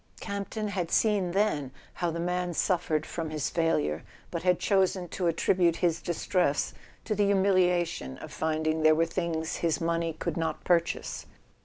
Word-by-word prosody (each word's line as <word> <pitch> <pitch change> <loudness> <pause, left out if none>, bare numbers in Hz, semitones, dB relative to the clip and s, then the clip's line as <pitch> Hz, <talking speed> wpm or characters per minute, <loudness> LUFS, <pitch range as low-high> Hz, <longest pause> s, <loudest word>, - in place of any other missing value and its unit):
Campton 200 +2 -4
had 180 -4 -2
seen 205 -4 +2
then 175 -8 +1 0.2
how 175 - -1
the 165 0 -3
man 180 0 -1
suf¬ 175 +1 0
fered 155 -1 0
from 165 -2 -4
his 150 -2 -2
failure, 80 - +1 0.3
but 170 - -3
had 180 -1 +3
chosen 190 -2 +1
to 180 +1 -1
attribute 170 +1 +2
his 170 -2 0
distress 175 -3 0 0.3
to 220 - 0
the 205 0 +2
humiliation 180 - +2
of - - -10
finding 155 0 0
there 155 0 +6
were 165 +1 +3
things 165 -1 -2
his 165 -2 0
money 165 0 0
could 160 +1 -4
not 160 -2 -2
purchase. 170 -1 0
170 Hz, 165 wpm, -28 LUFS, 160-185 Hz, 0.3 s, there